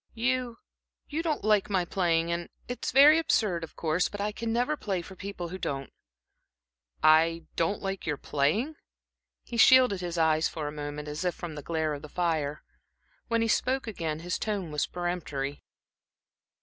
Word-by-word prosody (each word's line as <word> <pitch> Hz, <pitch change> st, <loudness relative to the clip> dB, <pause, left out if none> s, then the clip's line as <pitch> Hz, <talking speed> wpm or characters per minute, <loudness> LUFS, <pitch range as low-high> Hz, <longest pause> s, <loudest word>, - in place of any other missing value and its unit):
You 245 Hz, 0 st, 0 dB, 0.5 s
you 305 Hz, +2 st, -1 dB
don't 320 Hz, -3 st, -1 dB
like 210 Hz, -2 st, +3 dB
my 185 Hz, -3 st, +1 dB
playing, 170 Hz, -2 st, +1 dB
and 170 Hz, 0 st, -3 dB, 0.2 s
it's 245 Hz, -, -3 dB
very 290 Hz, +4 st, +8 dB
absurd, 200 Hz, -, +1 dB
of 165 Hz, -, -9 dB
course, 165 Hz, +2 st, 0 dB
but 205 Hz, -, -7 dB
I 210 Hz, +1 st, -1 dB
never 240 Hz, +6 st, 0 dB
can -, -, -23 dB
play 190 Hz, -4 st, -1 dB
for 190 Hz, -, -11 dB
people 185 Hz, -2 st, -6 dB
who 185 Hz, +2 st, -6 dB
don't." 140 Hz, -6 st, -4 dB, 1.1 s
"I 165 Hz, +1 st, +5 dB
don't 170 Hz, +6 st, 0 dB
like 195 Hz, -3 st, -4 dB
your 150 Hz, -2 st, 0 dB
playing?" 200 Hz, -, 0 dB, 0.7 s
He 235 Hz, -, -6 dB
shielded 250 Hz, -4 st, +6 dB
his 175 Hz, -1 st, -4 dB
eyes 160 Hz, -1 st, +3 dB
for 155 Hz, -2 st, -5 dB
a -, -, -3 dB
moment, 150 Hz, 0 st, -6 dB
as 150 Hz, +3 st, -4 dB
if 180 Hz, -1 st, 0 dB
from 170 Hz, -2 st, -6 dB
the 150 Hz, -, -7 dB
glare 160 Hz, 0 st, -1 dB
of 145 Hz, -, -6 dB
the 150 Hz, -, -10 dB
fire. 155 Hz, -4 st, -1 dB, 0.6 s
When 230 Hz, -1 st, +1 dB
he -, -, +1 dB
spoke 260 Hz, +4 st, +1 dB
again 165 Hz, -8 st, -3 dB
his 175 Hz, +1 st, -2 dB
tone 200 Hz, -7 st, -2 dB
was 150 Hz, -1 st, 0 dB
peremptory. 155 Hz, -6 st, -3 dB
175 Hz, 175 wpm, -28 LUFS, 155-220 Hz, 1.1 s, very